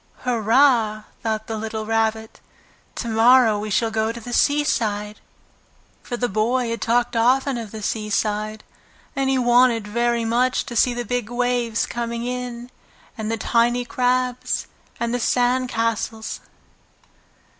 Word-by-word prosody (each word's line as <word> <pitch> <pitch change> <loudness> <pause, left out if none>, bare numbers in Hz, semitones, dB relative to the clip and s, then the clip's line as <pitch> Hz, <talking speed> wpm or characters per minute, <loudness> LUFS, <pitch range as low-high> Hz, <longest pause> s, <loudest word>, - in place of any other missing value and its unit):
"Hurrah!" 230 -2 +3 0.2
thought 220 -1 -2
the 220 -1 -4
little 220 0 -4
Rabbit. 220 0 -1 0.6
"To 235 - -4
morrow 225 -1 +5
we 215 +1 -4
shall 225 +2 +1
go 220 0 0
to 235 - -8
the 240 +1 -8
seaside!" 215 -8 +1 0.8
For 240 - -5
the 245 - 0
boy 235 +3 0
had 230 - -4
often 240 +1 +2
talked 250 +4 +2
of 225 -2 -7
the 220 -1 -7
seaside, 215 0 -2 0.5
and 270 -1 0
he 270 - +2
wanted 240 -3 +3
very 235 +1 0
much 245 +3 +1
to 240 - -7
see 240 +2 +3
the 240 0 -3
big 245 -1 -2
waves 245 -2 0
coming 235 0 -4
in, 250 -1 -5 0.4
and 220 -2 -4
the 225 - -1
tiny 240 +2 +1
crabs, 250 0 0 0.3
and 235 0 -1
the 245 - 0
sand 250 +2 +1
castles. 225 -1 -2
235 Hz, 145 wpm, -22 LUFS, 220-245 Hz, 0.8 s, morrow